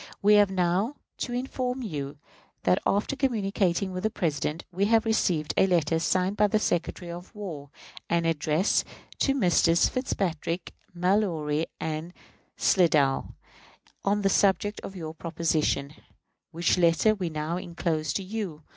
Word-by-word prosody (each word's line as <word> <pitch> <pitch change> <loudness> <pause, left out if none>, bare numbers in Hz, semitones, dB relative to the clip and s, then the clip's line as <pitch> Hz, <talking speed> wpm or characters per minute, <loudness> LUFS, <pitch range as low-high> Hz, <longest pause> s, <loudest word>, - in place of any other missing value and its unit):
we 210 +1 +5
have 205 -1 +6
now 190 +7 0 0.2
to 245 - -4
inform 250 0 -2
you 145 -7 -5 0.5
that, 90 - +3
after 205 +7 +1
communicating 200 -7 0
with 185 0 -4
the 220 - +1
President, 160 -4 -2
we 190 +3 +1
have 225 +1 +3
received 180 -9 +1
a 190 - +5
letter 165 -3 +2
signed 185 +3 +1
by 210 0 +4
the 210 - +2
Secretary 175 -3 -2
of 175 +5 -10
War, 165 -9 -7 0.4
and 170 -1 +1
addressed 160 +3 +1 0.4
to 275 - +2
Messrs. 175 -7 +4
Fitzpatrick, 180 - -2 0.2
Mallory, 170 -5 +1
and 160 +2 -4 0.4
Slidell, 150 -7 +2 0.7
on 205 +1 +1
the 195 - +3
subject 200 +2 +2
of 190 -1 -8
our 160 -1 -5
proposition, 160 -4 -1 0.6
which 170 +2 +1
letter 170 +5 +4
we 185 -5 -3
now 155 +2 -3
inclose 170 -4 -2
to 195 - -2
you. 185 -6 -5
180 Hz, 140 wpm, -27 LUFS, 160-205 Hz, 0.7 s, have